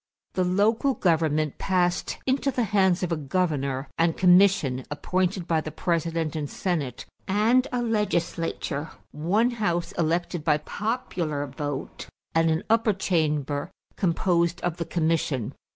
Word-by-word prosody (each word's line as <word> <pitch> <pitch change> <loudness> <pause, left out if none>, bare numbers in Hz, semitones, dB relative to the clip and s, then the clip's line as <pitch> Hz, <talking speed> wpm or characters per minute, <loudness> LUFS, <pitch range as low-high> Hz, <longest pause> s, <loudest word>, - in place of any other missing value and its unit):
The 185 - +1
local 215 +8 +2
government 155 -4 +1
passed 180 -2 0
into 265 +1 +1
the 250 -2 0
hands 190 -3 +2
of 180 - -1
a - - +2
governor 140 -3 -1
and 165 0 +2
commission, 180 -8 +4
appointed 180 +4 -1
by 160 -2 +2
the 155 - -5
President 165 -1 -1
and 150 -2 -3
Senate, 150 -10 -3 0.2
and 225 +7 +3
a 245 -1 -1
legislature 170 -8 -1 0.2
one 200 +11 +1
house 175 -7 -1
elected 170 0 0
by 150 -1 +3
popular 170 - -3
vote 145 0 -5 0.3
and 165 0 +3
an 160 +2 0
upper 225 -1 +3
chamber 150 -5 0 0.3
composed 170 -1 +1
of 175 -1 -2
the 170 - -3
commission. 160 -8 0
170 Hz, 135 wpm, -26 LUFS, 155-195 Hz, 0.3 s, commission